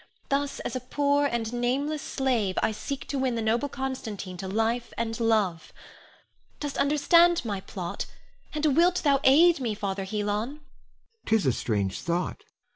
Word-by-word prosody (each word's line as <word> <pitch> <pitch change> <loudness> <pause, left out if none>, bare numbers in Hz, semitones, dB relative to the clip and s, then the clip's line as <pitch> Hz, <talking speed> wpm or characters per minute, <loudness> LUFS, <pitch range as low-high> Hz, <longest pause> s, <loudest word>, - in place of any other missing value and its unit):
Thus, 280 0 0
as - - -4
a - - 0
poor 285 +3 +1
and 235 -3 -2
nameless 275 +5 0
slave, 240 -11 0
I - - +2
seek 275 +5 -5
to 275 - -1
win 260 -2 0
the 230 - -1
noble 235 +6 +1
Constantine 240 -9 -5
to 190 - -5
life 225 +4 0
and 230 0 -2
love. 210 -8 +1 0.9
Dost 290 -2 -4
understand 335 +3 +4
my 205 -3 -2
plot, 180 -3 -5 0.4
and 300 -2 +1
wilt 350 +3 +3
thou 280 -3 +4
aid 320 +5 +6
me, 230 -5 -2
Father 195 -1 -3
Helon? 205 +1 -2
Helon. 225 +9 -2 0.7
'Tis 220 -5 +2
a 130 - +4
strange 100 -5 -1
thought! 170 +1 -2
240 Hz, 160 wpm, -27 LUFS, 205-285 Hz, 0.9 s, aid